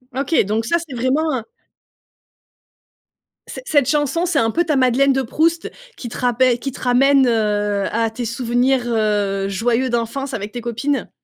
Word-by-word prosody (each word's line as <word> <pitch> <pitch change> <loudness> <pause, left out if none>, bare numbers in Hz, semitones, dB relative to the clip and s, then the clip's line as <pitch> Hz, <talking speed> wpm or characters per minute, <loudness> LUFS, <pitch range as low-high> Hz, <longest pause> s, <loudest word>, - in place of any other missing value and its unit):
OK 275 +4 -1
donc 215 +3 -1
ça 335 - +2
c'est 320 -6 -9
vraiment 265 +4 0
heu 225 - -10 2.0
ce - - -8
cette 290 - +2
chanson 300 +3 0
c'est 335 -5 +1
un 225 -2 +1
peu 345 +8 0
ta 305 - 0
madeleine 265 +1 +3
de 265 - 0
Proust 325 +7 0 0.2
qui 240 - -7
te - - -8
rappe 245 0 +1 0.2
qui 275 - -4
te - - -12
ramène, 265 +2 +4
heu, 210 -3 0
à 225 0 0
tes 235 +2 -5
souvenirs, 245 +2 0
heu, 205 -3 0
joyeux 235 +6 0
d'enfance 245 +4 -3
avec 210 -2 -5
tes 240 +1 -6
copines? 240 +5 -2
245 Hz, 170 wpm, -19 LUFS, 225-275 Hz, 2.0 s, ramène